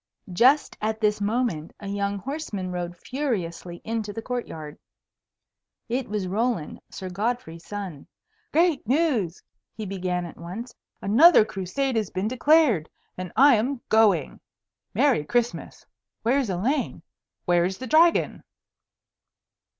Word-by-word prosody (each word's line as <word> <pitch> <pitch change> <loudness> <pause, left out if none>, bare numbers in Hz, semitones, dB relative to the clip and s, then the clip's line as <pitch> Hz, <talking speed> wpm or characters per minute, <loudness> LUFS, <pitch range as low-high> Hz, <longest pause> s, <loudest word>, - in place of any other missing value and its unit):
Just 260 +10 +4
at 220 0 -1
this 210 -1 +1
moment 205 -7 -1
a 205 - -8
young 200 0 -1
horseman 210 -6 -4
rode 175 -1 -4
furiously 180 - -4
into 220 -2 -3
the 225 - -6
court 245 0 -3
yard. 150 -1 -9 1.1
It 250 0 -2
was 205 -3 -2
Roland, 215 -3 -1
Sir 190 - -7
Godfrey's 190 -3 -3
son. 195 -8 -6 0.4
"Great 325 -7 +2
news!" 250 - +1 0.3
he 215 - -5
began 180 -2 -2
at 170 - -10
once. 200 +9 -7 0.3
"Another 230 - +7
Crusade 220 +8 -2
has 215 -4 -1
been 185 +3 -2
declared 255 - +3 0.3
and 180 -1 -6
I 275 +5 +7
am 250 +5 -1
going. 220 -2 +3 0.6
Merry 270 - +3
Christmas! 240 +9 -2 0.4
Where's 250 +1 +2
Elaine? 240 +11 -1 0.4
Where's 175 +1 +2
the 260 - -6
Dragon?" 325 +6 +3
215 Hz, 125 wpm, -25 LUFS, 185-255 Hz, 1.1 s, Another